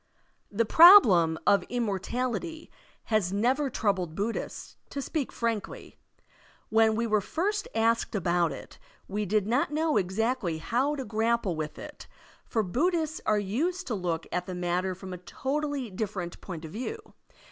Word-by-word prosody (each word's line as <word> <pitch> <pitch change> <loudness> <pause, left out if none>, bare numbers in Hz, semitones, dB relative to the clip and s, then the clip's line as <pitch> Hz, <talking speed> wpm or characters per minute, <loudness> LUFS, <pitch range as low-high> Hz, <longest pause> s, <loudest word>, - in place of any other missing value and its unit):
The 225 +3 +1
probletn 210 - +8
of 200 -1 +5
immortality 245 - -3 0.4
has 200 -4 +2
never 255 +8 +1
troubled 190 -8 -1
Buddhists, 215 +5 -4
to 280 - -5
speak 280 0 -3
frankly. 230 -3 -4 0.7
When 220 0 +4
we 230 +1 0
were 215 -2 +2
first 405 - -2
asked 230 +1 +1
about 175 -3 +1
it, - - -10 0.3
we 205 +1 -3
did 210 +1 +1
not 245 +6 +1
know 310 -1 +1
exactly 200 -1 -1
how 250 - 0
to 270 -3 -5
grapple 220 -3 0
with 155 -1 -5
it, - - -10 0.4
for 220 - 0
Buddhists 315 - 0
are 215 - +3
used 310 - -1
to 245 - -3
look 175 -5 -2
at 180 0 -2
the 185 - -5
matter 180 +1 -1
from 185 0 -8
a 180 - -7
totally 275 +5 -3
different 190 -3 -5
point 165 -4 -7
of 155 - -9
view. 345 - -6
220 Hz, 150 wpm, -28 LUFS, 185-265 Hz, 0.7 s, probletn